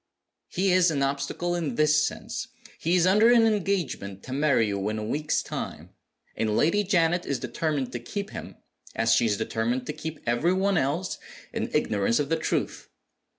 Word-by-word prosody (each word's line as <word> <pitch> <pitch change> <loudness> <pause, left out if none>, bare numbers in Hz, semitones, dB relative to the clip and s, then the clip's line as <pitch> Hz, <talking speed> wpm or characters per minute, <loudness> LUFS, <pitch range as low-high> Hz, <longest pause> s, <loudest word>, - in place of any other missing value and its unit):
"He 190 +1 0
is 180 -1 +5
an 140 -3 0
obstacle 140 +5 -1
in 170 -4 -2
this 150 0 +4
sense. - - -4 0.3
He 170 +3 +1
is 175 -1 +4
under 210 +5 +5
an 235 -2 +6
engagement 180 - -1
to 130 - -6
marry 140 -4 +3
you 100 -1 -2
in 110 - -3
a 110 - -3
week's 150 +7 -1
time; - - -6 0.4
and 110 -1 0
Lady 205 +7 +3
Janet 175 -3 +1
is 140 - 0
determined 145 0 -2
to 120 - -4
keep 200 - -5
him - - -8 0.4
(as 115 0 +3
she 115 0 +3
is 105 -2 +1
determined 115 +3 -1
to 150 - -4
keep 155 0 -6
every 120 +10 +2
one 190 -1 +2
else) 155 +7 -1 0.3
in - - -2
ignorance 105 +2 +1
of 145 -1 -1
the 165 - +2
truth. 160 - -2
150 Hz, 185 wpm, -26 LUFS, 120-180 Hz, 0.4 s, an